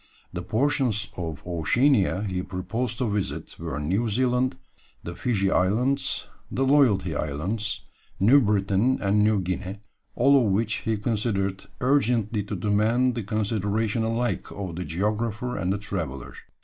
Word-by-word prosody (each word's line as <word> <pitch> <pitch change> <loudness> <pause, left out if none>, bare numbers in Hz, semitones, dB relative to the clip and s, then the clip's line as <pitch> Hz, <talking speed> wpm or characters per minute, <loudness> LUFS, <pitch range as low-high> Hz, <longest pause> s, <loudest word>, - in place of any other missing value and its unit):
The 90 - -3
portions 110 - 0
of 80 -5 -5
Oceania 100 - +2
he 95 -3 -2
proposed 100 +6 -3
to 125 - 0
visit 105 -2 -3
were 70 - -4
New 95 +10 0
Zealand, 125 +3 +1 0.5
the 85 - -5
Fiji 100 -6 0
Islands, 115 +9 +1 0.2
the 135 - 0
Loyalty 120 - +3
Islands, 95 +11 -2 0.4
New 120 +9 +6
Britain, 105 +3 +2
and 100 +1 +2
New 105 -1 +3
Guinea, 95 +2 -3 0.4
all 135 +1 +5
of 105 - +1
which 110 +2 +1
he 110 -1 -1
considered 105 -3 -1 0.2
urgently 120 -5 +2
to - - -4
demand 110 +5 +2
the 120 - -3
consideration 110 +1 -1
alike 115 +2 -1
of 95 -4 -5
the 90 +1 -4
geographer 110 +6 -2
and 95 -1 -1
the 100 - 0
traveller. 85 - -5
105 Hz, 140 wpm, -25 LUFS, 95-120 Hz, 0.5 s, New